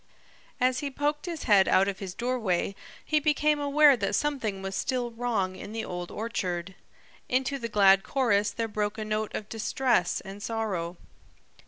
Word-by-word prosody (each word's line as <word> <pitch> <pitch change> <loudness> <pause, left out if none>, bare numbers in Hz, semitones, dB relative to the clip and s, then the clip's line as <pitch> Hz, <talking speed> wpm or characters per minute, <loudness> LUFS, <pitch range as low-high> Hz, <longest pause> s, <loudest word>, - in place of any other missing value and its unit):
As 255 0 +2
he 285 - -3
poked 295 +4 -2
his 335 -3 -4
head 200 -4 +5
out 190 +1 +4
of 195 -1 -3
his 190 -2 -6
doorway 230 -7 -1 0.3
he 305 - +2
became 300 0 +2
aware 290 0 +5
that 200 -3 -1
something 230 -10 -1
was 195 0 -4
still 245 +2 -1
wrong 225 -6 -1
in 205 +3 -8
the 225 0 -3
Old 175 0 -5
Orchard. 190 -5 -3 0.6
Into 265 +2 0
the 230 -2 -4
glad 195 -2 +5
chorus 210 -3 +1
there 230 +1 -3
broke 210 0 -2
a 215 - -4
note 215 0 -2
of 210 - -4
distress 225 -2 0
and 195 +1 -10
sorrow. 200 -6 -3
220 Hz, 170 wpm, -28 LUFS, 195-260 Hz, 0.6 s, head